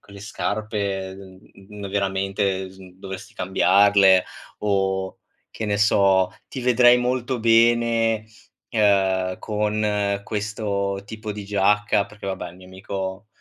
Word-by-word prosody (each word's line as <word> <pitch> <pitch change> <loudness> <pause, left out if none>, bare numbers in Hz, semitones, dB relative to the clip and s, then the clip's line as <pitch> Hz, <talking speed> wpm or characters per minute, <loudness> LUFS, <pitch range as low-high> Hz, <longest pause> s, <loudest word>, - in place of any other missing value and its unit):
quelle 100 0 -14
scarpe, 100 -2 -3
mhmm, 100 +1 -12
veramente 95 -1 -1
s 95 - -17 0.2
dovresti 95 0 -9
cambiarle." 95 0 +4 0.3
O, 95 -2 -1 0.3
che 110 - -5
ne 105 -1 0
so: 95 -3 +3 0.2
"Ti 130 - -6
vedrei 125 0 +5
molto 125 +1 -1
bene, 115 -1 +3 0.4
ehm, 95 -4 +2
con 105 -1 -1
questo 100 -2 -3
tipo 110 0 -7
di 105 0 -7
giacca." 100 0 +2
Perché 105 -1 -11
vabbè, 95 -2 -5
il 90 - -16
mio 95 - -15
amico, 95 +2 -6
100 Hz, 115 wpm, -23 LUFS, 95-110 Hz, 0.4 s, vedrei